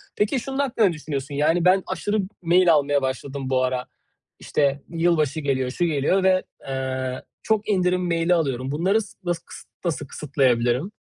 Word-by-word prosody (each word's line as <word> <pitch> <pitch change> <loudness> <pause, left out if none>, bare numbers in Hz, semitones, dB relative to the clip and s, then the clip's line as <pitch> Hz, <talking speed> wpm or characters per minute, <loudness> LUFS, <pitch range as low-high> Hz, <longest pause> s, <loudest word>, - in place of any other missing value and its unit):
Peki, 215 +6 +1
şunun 270 +2 -5
hakkında 235 -6 +2
ne 175 - 0
düşünüyorsun: 145 -2 -5
Yani, 160 +4 +2
ben 185 +1 +5
aşırı 210 +1 -1 0.2
mail 175 0 +5
almaya 145 -1 +2
başladım 135 0 -4
bu 130 -1 +2
ara, 130 -1 -1 0.5
işte, 140 -1 0
yılbaşı 165 -3 +1
geliyor, 130 -3 -1
şu 175 - 0
geliyor 160 +5 +1
ve, 185 -1 +3 0.2
eee, 130 -1 -3 0.2
çok 215 -1 0
indirim 180 -2 +1
mail'i 170 +1 +2
alıyorum. 135 -5 -1
Bunları 190 +9 +2
s 210 - -11
nası 175 -1 -2
kıs - - -10 0.3
nasıl 150 -4 -2
kısıtlayabilirim? 130 - +1
155 Hz, 165 wpm, -23 LUFS, 135-180 Hz, 0.5 s, ben